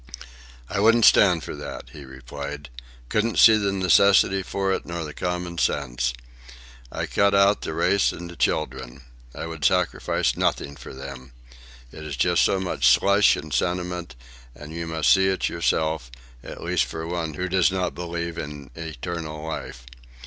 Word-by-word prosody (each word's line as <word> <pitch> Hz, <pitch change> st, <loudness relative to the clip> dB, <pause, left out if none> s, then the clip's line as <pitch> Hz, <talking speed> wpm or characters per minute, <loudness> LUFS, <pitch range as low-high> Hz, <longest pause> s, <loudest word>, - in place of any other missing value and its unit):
"I 100 Hz, -, -3 dB
wouldn't 115 Hz, +2 st, +5 dB
stand 90 Hz, -6 st, +5 dB
for -, -, -6 dB
that," -, -, -8 dB
he 75 Hz, -2 st, -10 dB
replied. 70 Hz, +2 st, -8 dB, 0.4 s
"Couldn't 110 Hz, -, 0 dB
see 110 Hz, -, +8 dB
the 100 Hz, -2 st, 0 dB
necessity 95 Hz, 0 st, +4 dB
for 95 Hz, +1 st, -1 dB
it, -, -, -3 dB
nor 85 Hz, 0 st, -5 dB
the 75 Hz, -1 st, -7 dB
common 90 Hz, -1 st, -4 dB
sense. 60 Hz, -5 st, 0 dB, 0.8 s
I -, -, -3 dB
cut 100 Hz, 0 st, +2 dB
out 100 Hz, +1 st, +4 dB
the 80 Hz, -, -5 dB
race 95 Hz, +4 st, +2 dB
and 85 Hz, -, -8 dB
the 85 Hz, -, -10 dB
children. 65 Hz, -7 st, -2 dB, 0.3 s
I -, -, -5 dB
would 80 Hz, -3 st, -7 dB
sacrifice -, -, +1 dB
nothing 70 Hz, -, -1 dB
for -, -, -11 dB
them. 70 Hz, -1 st, -9 dB, 0.6 s
It's 75 Hz, -2 st, -7 dB
just 85 Hz, +6 st, +2 dB
so 95 Hz, -, +2 dB
much 95 Hz, -1 st, 0 dB
slush 100 Hz, +1 st, +5 dB
and 75 Hz, -1 st, -7 dB
sentiment, 90 Hz, +2 st, -2 dB, 0.4 s
and 75 Hz, +2 st, -10 dB
you 85 Hz, 0 st, -5 dB
must 80 Hz, -1 st, +3 dB
see 95 Hz, -1 st, +3 dB
it 95 Hz, 0 st, 0 dB
yourself, 80 Hz, -5 st, -1 dB, 0.3 s
at -, -, -9 dB
least -, -, +1 dB
for 80 Hz, 0 st, -6 dB
one 85 Hz, -2 st, -3 dB
who 90 Hz, +3 st, -3 dB
does 95 Hz, 0 st, +2 dB
not 90 Hz, -2 st, -2 dB
believe 85 Hz, -1 st, -5 dB
in 70 Hz, -2 st, -8 dB
eternal 80 Hz, 0 st, -6 dB
life. -, -, -6 dB
85 Hz, 165 wpm, -24 LUFS, 75-95 Hz, 0.8 s, see